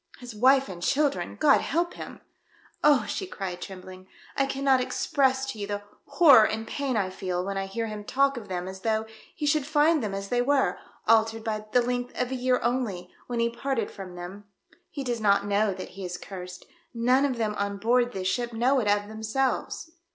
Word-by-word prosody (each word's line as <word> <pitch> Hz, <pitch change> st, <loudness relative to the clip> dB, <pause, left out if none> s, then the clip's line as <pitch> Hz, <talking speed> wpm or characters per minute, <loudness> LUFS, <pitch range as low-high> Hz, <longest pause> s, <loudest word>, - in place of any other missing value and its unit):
" -, -, -19 dB
His 245 Hz, -2 st, -9 dB
wife 265 Hz, +5 st, +4 dB
and 175 Hz, -2 st, -8 dB
children! 285 Hz, +6 st, 0 dB
God 295 Hz, -2 st, +5 dB
help 345 Hz, +2 st, -1 dB
him -, -, -9 dB, 0.2 s
!" -, -, -34 dB
" -, -, -32 dB
Oh 295 Hz, -3 st, +5 dB
!" -, -, -9 dB
she 385 Hz, -, -3 dB
cried, 185 Hz, -, -5 dB
trembling, 185 Hz, -1 st, -9 dB
" -, -, -23 dB
I 275 Hz, -, +2 dB
cannot 270 Hz, -1 st, +2 dB
express 265 Hz, +1 st, +1 dB
to 220 Hz, -, -10 dB
you 200 Hz, -, -3 dB
the 205 Hz, 0 st, -4 dB, 0.2 s
horror 290 Hz, -10 st, +7 dB
and 220 Hz, +1 st, -4 dB
pain 275 Hz, -4 st, -2 dB
I 190 Hz, -3 st, 0 dB
feel 185 Hz, -1 st, -3 dB
when 195 Hz, 0 st, -3 dB
I 195 Hz, 0 st, -2 dB
hear 225 Hz, +4 st, -3 dB
him 215 Hz, -1 st, -6 dB
talk 275 Hz, +5 st, +2 dB
of 230 Hz, -4 st, -7 dB
them 180 Hz, -1 st, -4 dB
as 190 Hz, 0 st, -7 dB
though 220 Hz, 0 st, 0 dB, 0.3 s
he 300 Hz, -, -3 dB
should 295 Hz, 0 st, +2 dB
find 305 Hz, +2 st, +3 dB
them 205 Hz, -3 st, -3 dB
as 195 Hz, 0 st, -5 dB
they 245 Hz, 0 st, +2 dB
were 275 Hz, +2 st, +1 dB
— -, -, -31 dB
altered 225 Hz, 0 st, +3 dB
by 215 Hz, -1 st, -3 dB
the 245 Hz, +1 st, +4 dB
length 245 Hz, 0 st, -3 dB
of 250 Hz, 0 st, -1 dB
a -, -, -1 dB
year 255 Hz, 0 st, +1 dB
only 225 Hz, -7 st, -1 dB
— -, -, -29 dB
when 240 Hz, -1 st, -2 dB
he 235 Hz, 0 st, +1 dB
parted 235 Hz, -2 st, -2 dB
from 185 Hz, -3 st, -9 dB
them. 180 Hz, +4 st, -8 dB, 0.4 s
He 280 Hz, -, -5 dB
does 240 Hz, -3 st, -2 dB
not 200 Hz, -1 st, +3 dB
know 205 Hz, +1 st, +2 dB
that 185 Hz, -1 st, -6 dB
he 195 Hz, 0 st, -9 dB
is 180 Hz, -1 st, -4 dB
cursed 180 Hz, -1 st, -9 dB, 0.2 s
— -, -, -46 dB
none 250 Hz, +4 st, +3 dB
of 270 Hz, -4 st, 0 dB
them 220 Hz, -2 st, 0 dB
on 200 Hz, 0 st, -1 dB
board 240 Hz, +4 st, +2 dB
this 185 Hz, -3 st, -3 dB
ship 240 Hz, +3 st, -1 dB
know 255 Hz, +4 st, +2 dB
it 220 Hz, -, -1 dB
of 205 Hz, 0 st, +2 dB
themselves." 220 Hz, +8 st, -2 dB
225 Hz, 230 wpm, -27 LUFS, 200-265 Hz, 0.4 s, horror